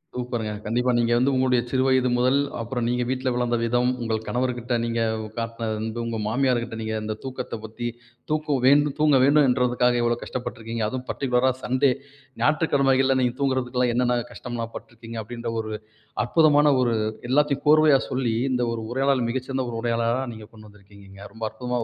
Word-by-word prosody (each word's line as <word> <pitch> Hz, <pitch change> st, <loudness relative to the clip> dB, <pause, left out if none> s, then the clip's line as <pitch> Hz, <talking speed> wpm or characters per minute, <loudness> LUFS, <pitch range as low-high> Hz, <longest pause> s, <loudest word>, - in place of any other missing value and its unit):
சூப்பர்ங்க! 120 Hz, -3 st, -3 dB
கண்டிப்பா. 125 Hz, +3 st, +1 dB
நீங்க 120 Hz, 0 st, +1 dB
வந்து, 130 Hz, +3 st, +2 dB
உங்களுடைய 130 Hz, -2 st, +2 dB
சிறு 130 Hz, 0 st, +1 dB
வயது 130 Hz, -1 st, +3 dB
முதல், 130 Hz, +3 st, +3 dB, 0.2 s
அப்பறம் 115 Hz, +1 st, -3 dB
நீங்க 125 Hz, 0 st, 0 dB
வீட்ல 130 Hz, 0 st, -1 dB
வளர்ந்த 120 Hz, -1 st, 0 dB
விதம், 120 Hz, +2 st, +2 dB
உங்கள் 110 Hz, -1 st, -1 dB
கணவர்கிட்ட 125 Hz, -1 st, -1 dB
நீங்க 115 Hz, 0 st, -1 dB, 0.4 s
காட்டின 115 Hz, 0 st, -3 dB
அன்பு, 110 Hz, +1 st, -4 dB
உங்க 115 Hz, -1 st, -3 dB
மாமியார்கிட்ட 120 Hz, -1 st, 0 dB
நீங்க 110 Hz, 0 st, -3 dB
அந்த 110 Hz, 0 st, -3 dB
தூக்கத்தப் 125 Hz, -4 st, -6 dB
பத்தி 115 Hz, +2 st, -5 dB, 0.4 s
தூக்கம் 150 Hz, -4 st, 0 dB
வேண்டும் 145 Hz, 0 st, +4 dB
தூங்கவேண்டும்ன்றதுக்காக 130 Hz, -4 st, +3 dB
இவ்வளவு 120 Hz, 0 st, 0 dB
கஷ்டப்பட்டு 125 Hz, -2 st, -5 dB
இருக்கிறீங்க. 115 Hz, 0 st, -3 dB
அதுவும் 130 Hz, +1 st, -5 dB
பர்ட்டிகுலரா 130 Hz, -1 st, +1 dB
சண்டே, 130 Hz, +1 st, +2 dB, 0.5 s
ஞாயிற்றுக்கிழமைகள்ல 135 Hz, -4 st, +3 dB
நீங்க 125 Hz, 0 st, 0 dB
தூங்குறதுக்கெல்லாம் 125 Hz, -2 st, +1 dB
என்னென்ன 125 Hz, -1 st, +2 dB
கஷ்டம்லாம் 115 Hz, -2 st, -6 dB
பட்டுருக்கிறீங்க. 115 Hz, -1 st, -9 dB
அப்படின்ற 115 Hz, +1 st, -5 dB
ஒரு 110 Hz, 0 st, -7 dB, 0.5 s
அற்புதமான 150 Hz, +1 st, +4 dB
ஒரு 120 Hz, -2 st, +2 dB, 0.4 s
எல்லாத்தையும் 145 Hz, 0 st, +2 dB
கோர்வையா 155 Hz, -2 st, +6 dB
சொல்லி, 125 Hz, -3 st, -1 dB, 0.2 s
இந்த 125 Hz, -1 st, 0 dB
ஒரு 115 Hz, -, -4 dB
உரையாடல் 135 Hz, -2 st, +1 dB
மிகச்சிறந்த 130 Hz, +1 st, -2 dB
ஒரு 115 Hz, -, -4 dB
உரையாடலா 115 Hz, 0 st, 0 dB, 0.2 s
நீங்க 110 Hz, -1 st, -11 dB
கொண்டு 110 Hz, -1 st, -14 dB
வந்திருக்கிறீங்க. 100 Hz, 0 st, -14 dB
ரொம்ப 110 Hz, 0 st, -9 dB
அற்புதமான 125 Hz, +1 st, -3 dB
125 Hz, 155 wpm, -24 LUFS, 115-130 Hz, 0.5 s, கோர்வையா